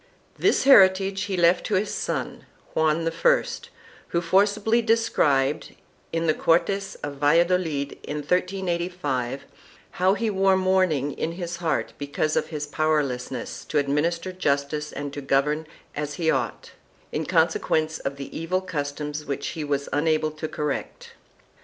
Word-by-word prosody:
3 - - -19
This - - +3
heritage 195 -6 +6
he 195 -2 -3
left 175 +1 +4
to - - 0
his 200 +3 0
son, - - -4 0.3
Juan 160 +1 +1
I, - - +3 0.6
who 170 - 0
forcibly 205 +6 +2
described, 155 - +1 0.4
in 165 0 -1
the 155 - +3
Cortes 195 +5 +1
of 145 -1 -5
Valladolid 160 -1 +1
in 145 - -5
1385, 170 -6 -1 0.5
how 185 +2 +2
he 220 +1 -1
wore 195 -1 +3
mourning 185 -7 +2
in 160 +4 -3
his 175 -1 -5
heart 165 -3 -1
because 145 +2 -1
of - - +1
his 150 -2 -4
power 155 0 +1
lessness 125 -2 -5
to 155 - -1
administer 165 +6 0
justice 150 -3 -1
and 145 0 -5
to 145 - -5
govern 150 +3 +1 0.3
as 145 0 -3
he 165 -3 +1
ought, 125 -4 -3 0.4
in - - -3
con - - +4
sequence 155 0 -1
of 135 - -4
the 140 -1 -8
evil 185 +3 -1
customs 150 -3 -4
which 140 0 -3
he 160 -3 -5
was 140 -1 -1
unable 155 +1 +1
to 155 +1 -5
correct. 150 -2 -4
160 Hz, 150 wpm, -25 LUFS, 145-185 Hz, 0.6 s, heritage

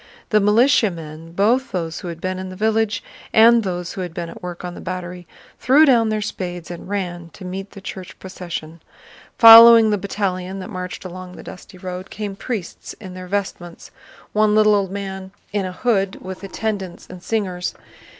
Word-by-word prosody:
The 215 - +4
militiamen, 190 - +1
both 230 +8 +2
those 165 -3 -3
who - - -8
had 170 -1 -6
been 185 +1 -3
in 185 0 -6
the 185 - -8
village 220 +1 0 0.3
and 230 +1 +7
those 180 -3 -4
who 190 - -5
had 175 -2 -6
been 170 -1 -4
at - - -12
work 180 0 -7
on 175 - -5
the - - -10
battery, 180 -1 -6 0.3
threw 285 +5 +5
down 235 -6 +4
their 215 -1 -1
spades 175 -4 -5
and 175 +2 -9
ran 175 -4 -4
to 185 - -11
meet 190 +2 -6
the 200 - -12
church 190 -1 -8
procession. 170 -3 -7 0.6
Following 230 -1 +10
the 205 - 0
battalion 190 -1 -3
that 195 +3 -7
marched 185 -1 -6
along 185 0 -8
the - - -11
dusty 185 0 -11
road 185 +1 -7
came 205 -2 -5
priests 210 -3 -6
in 190 -4 -11
their 185 0 -8
vestments—one 200 +2 -3
little 215 0 +5
old 200 -2 +1
man 190 -1 -6 0.2
in 205 -2 0
a - - -5
hood 195 -1 0
with 190 +1 -8
attendants 195 -2 -4
and 185 -1 -11
singers. 185 -3 -2
190 Hz, 180 wpm, -20 LUFS, 180-210 Hz, 0.6 s, Following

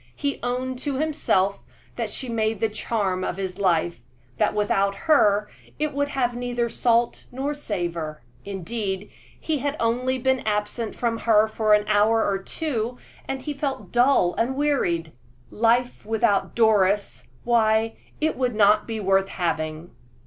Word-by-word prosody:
He 285 -1 -2
owned 250 +1 -2
to 280 0 -2
himself 265 -11 +1 0.3
that - - -2
she 260 - -5
made 220 -2 -1
the 225 - +1
charm 205 -3 -1
of 180 - -3
his 190 -1 -4
life 175 -3 +1 0.4
that - - +2
without 200 -1 +1
her 210 -10 +4 0.3
it 305 0 -1
would 285 +1 0
have 250 -4 0
neither 245 -1 -1
salt 235 0 +1
nor 270 +4 -2
savor. 170 - -4 0.2
Indeed, 195 +1 -4 0.3
he 310 -3 -1
had 285 +3 -2
only 250 +3 +1
been 260 +1 +1
absent 210 +1 -2
from 230 -2 -1
her 220 -1 +3 0.2
an 210 0 -1
hour 215 +2 +3
or 195 -1 0
two, 245 0 -3 0.3
and 265 -1 -4
he 300 - -3
felt 275 -1 -4
dull 245 -7 +4
and 250 +3 +1
wearied. 215 - 0 0.4
Life 235 +2 +1
without 210 -2 +1
Doris 205 -3 +2 0.2
why 225 -1 +2 0.2
it 315 +1 +1
would 250 -3 -1
not 210 0 +4
be 225 -1 -3
worth 195 -1 +2
having! 160 -2 -3
225 Hz, 150 wpm, -24 LUFS, 200-255 Hz, 0.4 s, her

